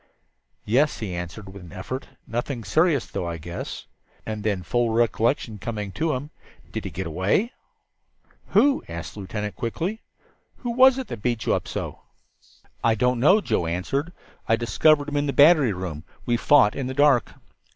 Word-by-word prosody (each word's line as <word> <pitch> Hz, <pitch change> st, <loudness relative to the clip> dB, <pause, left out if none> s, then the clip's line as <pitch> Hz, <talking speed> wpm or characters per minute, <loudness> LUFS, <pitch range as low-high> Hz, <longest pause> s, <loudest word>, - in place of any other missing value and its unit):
"Yes," 135 Hz, +8 st, +2 dB
he 105 Hz, -5 st, -4 dB
answered 90 Hz, +4 st, -6 dB
with 100 Hz, -, -10 dB
an 85 Hz, -, -12 dB
effort. 115 Hz, +8 st, -6 dB, 0.2 s
"Nothing 120 Hz, +1 st, -3 dB
serious, 145 Hz, -, +2 dB
though, 85 Hz, -, -4 dB
I 85 Hz, -1 st, -4 dB
guess." 85 Hz, +2 st, -6 dB, 0.4 s
And 110 Hz, -1 st, -4 dB
then, 100 Hz, -4 st, -1 dB
full 120 Hz, +5 st, +1 dB
recollection 115 Hz, 0 st, +1 dB
coming 105 Hz, -3 st, -4 dB
to 155 Hz, -, -1 dB
him, 140 Hz, +4 st, -5 dB, 0.4 s
"Did -, -, -5 dB
he -, -, -2 dB
get 95 Hz, +5 st, -5 dB
away?" 95 Hz, -, +1 dB, 1.0 s
"Who?" 280 Hz, -1 st, +3 dB
asked 85 Hz, -1 st, -6 dB
the -, -, -10 dB
lieutenant 105 Hz, +1 st, -4 dB
quickly. 175 Hz, -, -3 dB, 0.6 s
"Who 245 Hz, -, -4 dB
was 260 Hz, +2 st, +6 dB
it 235 Hz, -, -5 dB
beat 120 Hz, 0 st, -1 dB
you -, -, +2 dB
up -, -, -2 dB
so?" -, -, -5 dB, 0.8 s
"I 115 Hz, -1 st, +4 dB
don't 125 Hz, +2 st, +1 dB
know," 185 Hz, -, +5 dB
Joe 85 Hz, -, 0 dB
answered. 135 Hz, -, -2 dB, 0.4 s
"I 115 Hz, -, +5 dB
discovered 145 Hz, +5 st, +3 dB
him 145 Hz, -1 st, -2 dB
in 145 Hz, 0 st, 0 dB
the 140 Hz, -, -1 dB
battery 145 Hz, -4 st, +6 dB
room. 90 Hz, -5 st, -5 dB, 0.2 s
We 120 Hz, -, +2 dB
fought 125 Hz, -3 st, +4 dB
in 130 Hz, -, -3 dB
the 130 Hz, -, -4 dB
dark." 145 Hz, -4 st, +3 dB
115 Hz, 170 wpm, -24 LUFS, 100-145 Hz, 1.0 s, was